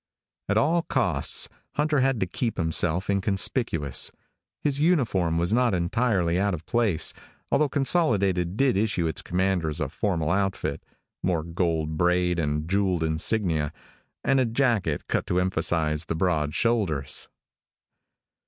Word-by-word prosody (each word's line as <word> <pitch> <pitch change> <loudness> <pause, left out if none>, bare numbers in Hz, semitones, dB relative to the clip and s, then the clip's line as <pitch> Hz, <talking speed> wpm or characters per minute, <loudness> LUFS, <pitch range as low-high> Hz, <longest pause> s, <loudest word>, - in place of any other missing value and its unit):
At 100 - +2
all 165 +8 +3
costs, - - 0 0.3
Hunter 150 0 +1
had 135 -2 +1
to - - +3
keep 115 +6 -3
himself 85 +1 +1
inconspicuous. 95 - 0 0.5
His 145 -2 +1
uniform 115 - +2
was 85 +5 +1
not 120 -4 +3
entirely 90 -1 +1
out 100 -1 +1
of 80 -1 -11
place, 110 -8 +2 0.4
although 150 0 +3
Consolidated 105 - +1
did 135 -4 +3
issue 100 -5 0
its 80 - -2
commanders 90 -4 -1
a 75 -4 -2
formal 80 -2 -1
outfit 95 0 -1 0.4
more 85 -4 0
gold 80 -2 -1
braid, 90 0 +2
a 75 -1 0
jeweled 90 0 0
insignia, 80 -1 0 0.5
and 135 0 +3
a 130 - +3
jacket 115 - 0
cut - - -1
to 90 - +1
emphasize 80 -4 +1
the 80 - -3
broad 80 -4 0
shoulders. 95 - 0
90 Hz, 135 wpm, -25 LUFS, 80-115 Hz, 0.5 s, all